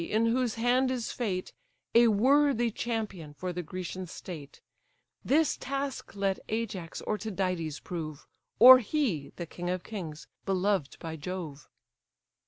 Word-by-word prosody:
in 215 Hz, +6 st, +1 dB
whose 240 Hz, 0 st, +1 dB
hand 245 Hz, +3 st, +2 dB
is 250 Hz, -3 st, -2 dB
fate, 190 Hz, -7 st, -3 dB, 0.4 s
A 235 Hz, 0 st, +7 dB
worthy 245 Hz, +2 st, +4 dB
champion 210 Hz, -10 st, -4 dB
for 180 Hz, +4 st, -4 dB
the 180 Hz, -, -3 dB
Grecian 185 Hz, +2 st, -6 dB
state: 160 Hz, -4 st, -9 dB, 0.6 s
This 310 Hz, +3 st, +3 dB
task 275 Hz, -2 st, -4 dB
let 195 Hz, -1 st, 0 dB
Ajax 210 Hz, -7 st, -3 dB
or 215 Hz, -, -1 dB
Tydides 185 Hz, -7 st, -2 dB
prove, 155 Hz, -4 st, -6 dB, 0.3 s
Or 255 Hz, +2 st, +11 dB
he, 220 Hz, -, -1 dB
the 175 Hz, -, -5 dB
king 175 Hz, +2 st, -5 dB
of 180 Hz, 0 st, -2 dB
kings, 170 Hz, -8 st, -6 dB, 0.2 s
beloved 190 Hz, -5 st, 0 dB
by 160 Hz, -1 st, -6 dB
Jove." 160 Hz, -3 st, -6 dB
195 Hz, 135 wpm, -29 LUFS, 175-235 Hz, 0.6 s, Or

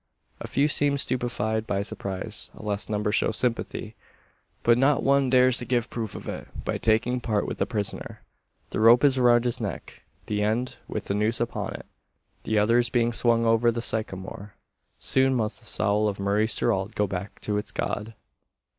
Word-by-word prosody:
A -, -, -6 dB
few 140 Hz, +2 st, +2 dB
seem 145 Hz, -1 st, +2 dB
stupefied 120 Hz, -4 st, -1 dB
by 100 Hz, 0 st, 0 dB
surprise; 95 Hz, -2 st, -5 dB
a -, -, -12 dB
less 105 Hz, 0 st, -1 dB
number 105 Hz, 0 st, 0 dB
show -, -, +2 dB
sympathy; 115 Hz, -1 st, -2 dB, 0.7 s
but 120 Hz, -, +5 dB
not 135 Hz, +3 st, +2 dB
one 140 Hz, -1 st, +3 dB
dares 125 Hz, -1 st, +4 dB
to 120 Hz, -, -5 dB
give 120 Hz, -1 st, -1 dB
proof 115 Hz, -3 st, -4 dB
of -, -, -8 dB
it, -, -, -6 dB, 0.2 s
by -, -, -2 dB
taking 115 Hz, +3 st, +1 dB
part 105 Hz, -3 st, 0 dB
with -, -, -5 dB
the -, -, +1 dB
prisoner. 105 Hz, -4 st, -4 dB, 0.5 s
The -, -, -2 dB
rope 115 Hz, +4 st, +6 dB
is 135 Hz, -2 st, +4 dB
around 120 Hz, -1 st, +4 dB
his 120 Hz, -1 st, -1 dB
neck 100 Hz, -7 st, -6 dB, 0.2 s
the 105 Hz, -1 st, -2 dB
end 110 Hz, +4 st, -1 dB
with -, -, -4 dB
the -, -, -2 dB
noose 105 Hz, +3 st, 0 dB
upon 120 Hz, 0 st, -3 dB
it. -, -, -9 dB, 0.6 s
The 110 Hz, -, 0 dB
other 115 Hz, +3 st, +4 dB
is 120 Hz, -1 st, +1 dB
being 120 Hz, 0 st, +1 dB
swung 115 Hz, 0 st, +2 dB
over 115 Hz, +1 st, +4 dB
the 115 Hz, 0 st, -1 dB
sycamore. 105 Hz, -3 st, -3 dB, 0.4 s
"Soon 130 Hz, 0 st, +2 dB
must 110 Hz, -2 st, -1 dB
the -, -, -15 dB
soul 105 Hz, 0 st, +1 dB
of 100 Hz, -1 st, -3 dB
Maurice 105 Hz, +3 st, +1 dB
Gerald 100 Hz, -2 st, 0 dB
go 105 Hz, -, +2 dB
back 95 Hz, +1 st, -6 dB
to 105 Hz, -1 st, -1 dB
its 105 Hz, -, -2 dB
God!" 110 Hz, +2 st, -3 dB
115 Hz, 190 wpm, -26 LUFS, 105-120 Hz, 0.7 s, rope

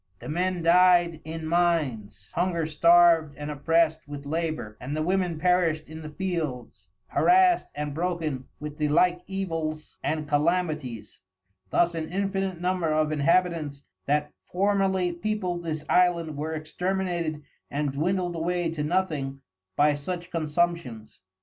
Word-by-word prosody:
The -, -, -10 dB
Men 180 Hz, +2 st, -1 dB
died 175 Hz, -1 st, +5 dB
in 160 Hz, +1 st, -6 dB
Mines, 160 Hz, -11 st, 0 dB
hunger 170 Hz, -2 st, 0 dB
starved 165 Hz, -1 st, +5 dB
and 145 Hz, 0 st, -5 dB
oppressed 160 Hz, +2 st, +1 dB
with 145 Hz, -1 st, -8 dB
labor, 155 Hz, -8 st, -3 dB
and 140 Hz, +5 st, -4 dB
the 155 Hz, -, 0 dB
Women 180 Hz, -1 st, 0 dB
perished 170 Hz, -2 st, +1 dB
in 160 Hz, +1 st, -9 dB
the 155 Hz, -, -7 dB
Fields, 155 Hz, -7 st, -4 dB, 0.2 s
harrassed 365 Hz, -1 st, +4 dB
and 145 Hz, 0 st, -3 dB
broken 160 Hz, -5 st, -2 dB
with 150 Hz, 0 st, -7 dB
the 150 Hz, -, +1 dB
like 175 Hz, +4 st, +3 dB
Evils 165 Hz, -5 st, -4 dB
and 155 Hz, 0 st, -2 dB
Calamities: 150 Hz, -, -1 dB, 0.5 s
Thus 175 Hz, -, +2 dB
an 160 Hz, -1 st, -4 dB
infinite 195 Hz, -1 st, -1 dB
number 180 Hz, -1 st, 0 dB
of 155 Hz, 0 st, +1 dB
Inhabitants 155 Hz, -1 st, +1 dB, 0.2 s
that 150 Hz, +1 st, +1 dB, 0.2 s
formerly 190 Hz, -1 st, +1 dB
peopled 180 Hz, -1 st, -2 dB
this 155 Hz, -2 st, -4 dB
Island 170 Hz, -4 st, +2 dB
were 155 Hz, +2 st, -3 dB
exterminated 170 Hz, -1 st, -2 dB, 0.3 s
and 145 Hz, 0 st, -1 dB
dwindled 175 Hz, +5 st, -1 dB
away 170 Hz, 0 st, -1 dB
to 155 Hz, -2 st, -3 dB
nothing 150 Hz, -5 st, -1 dB, 0.3 s
by 150 Hz, 0 st, +4 dB
such 175 Hz, +5 st, -5 dB
Consumptions. 155 Hz, -8 st, -2 dB
165 Hz, 135 wpm, -26 LUFS, 150-180 Hz, 0.5 s, died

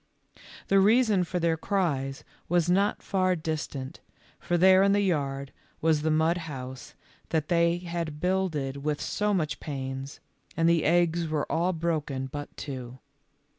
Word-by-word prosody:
The 195 Hz, -, +4 dB
reason 215 Hz, -1 st, +4 dB
for 180 Hz, -, -3 dB
their 165 Hz, -1 st, +1 dB
cries 155 Hz, -8 st, -1 dB, 0.3 s
was 175 Hz, -1 st, +2 dB
not 195 Hz, +3 st, +2 dB
far 185 Hz, -2 st, +1 dB
distant, 150 Hz, -4 st, -4 dB, 0.4 s
for 175 Hz, -, 0 dB
there 185 Hz, +2 st, +6 dB
in 200 Hz, 0 st, +4 dB
the 205 Hz, -, +3 dB
yard 140 Hz, -7 st, -1 dB, 0.3 s
was 160 Hz, -2 st, +2 dB
the 160 Hz, -, 0 dB
mud 160 Hz, +2 st, +2 dB
house 130 Hz, -2 st, -8 dB, 0.3 s
that 155 Hz, -2 st, -1 dB
they 170 Hz, 0 st, +3 dB
had 170 Hz, -3 st, -4 dB
builded 170 Hz, -7 st, -1 dB
with 150 Hz, +1 st, -2 dB
so 210 Hz, 0 st, -1 dB
much 160 Hz, -6 st, -1 dB
pains, 135 Hz, -1 st, -5 dB, 0.4 s
and 165 Hz, 0 st, +3 dB
the 165 Hz, -2 st, +3 dB
eggs 170 Hz, 0 st, +2 dB
were 155 Hz, -2 st, -1 dB
all 175 Hz, +3 st, +1 dB
broken 155 Hz, -6 st, -2 dB
but 145 Hz, +2 st, -7 dB
two. 130 Hz, -3 st, -6 dB
165 Hz, 150 wpm, -27 LUFS, 145-180 Hz, 0.4 s, there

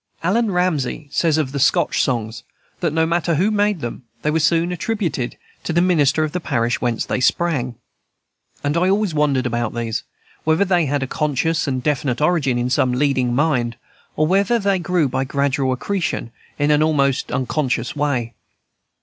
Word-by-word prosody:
Allan 215 Hz, +6 st, +2 dB
Ramsay 160 Hz, -6 st, -1 dB
says 160 Hz, -1 st, +2 dB
of 150 Hz, -4 st, -1 dB
the 140 Hz, -, -3 dB
Scotch 135 Hz, -, +2 dB
songs, 115 Hz, -2 st, -2 dB, 0.4 s
that, 170 Hz, -3 st, 0 dB
no 160 Hz, +1 st, +2 dB
matter 170 Hz, 0 st, 0 dB
who 190 Hz, +8 st, +2 dB
made 205 Hz, -4 st, +1 dB
them, 120 Hz, +2 st, -5 dB, 0.2 s
they 150 Hz, -, +1 dB
were 160 Hz, -, +1 dB
soon 170 Hz, +2 st, +2 dB
attributed 175 Hz, -, -2 dB, 0.3 s
to -, -, -3 dB
the 170 Hz, -, +3 dB
minister 155 Hz, -4 st, +3 dB
of 155 Hz, -, -2 dB
the 180 Hz, -, -2 dB
parish 120 Hz, -7 st, -1 dB
whence 120 Hz, -2 st, -1 dB
they -, -, -1 dB
sprang. 130 Hz, -3 st, +1 dB, 0.9 s
And 145 Hz, +1 st, 0 dB
I 180 Hz, +2 st, +2 dB
always 200 Hz, -2 st, +1 dB
wondered, 145 Hz, -4 st, +1 dB
about 120 Hz, -2 st, -2 dB
these, 115 Hz, -1 st, -2 dB, 0.4 s
whether 160 Hz, +5 st, +2 dB
they 175 Hz, -4 st, +2 dB
had 140 Hz, 0 st, 0 dB
always 130 Hz, -, -6 dB
a -, -, -5 dB
conscious 150 Hz, +2 st, 0 dB
and 130 Hz, -2 st, -2 dB
definite 140 Hz, -4 st, 0 dB
origin 150 Hz, -5 st, +2 dB
in 120 Hz, +1 st, -1 dB
some 125 Hz, -1 st, +2 dB
leading 130 Hz, -2 st, +1 dB
mind, 125 Hz, -5 st, +1 dB, 0.4 s
or 155 Hz, -, +2 dB
whether 200 Hz, +7 st, +2 dB
they 200 Hz, -3 st, +1 dB
grew 175 Hz, -3 st, +1 dB
by 130 Hz, +1 st, -1 dB
gradual 140 Hz, 0 st, 0 dB
accretion, 160 Hz, -2 st, -2 dB, 0.3 s
in 145 Hz, 0 st, +2 dB
an 150 Hz, 0 st, +4 dB
almost 140 Hz, -4 st, +1 dB
unconscious 130 Hz, -1 st, -1 dB
way. 135 Hz, -6 st, -1 dB
150 Hz, 180 wpm, -20 LUFS, 130-170 Hz, 0.9 s, an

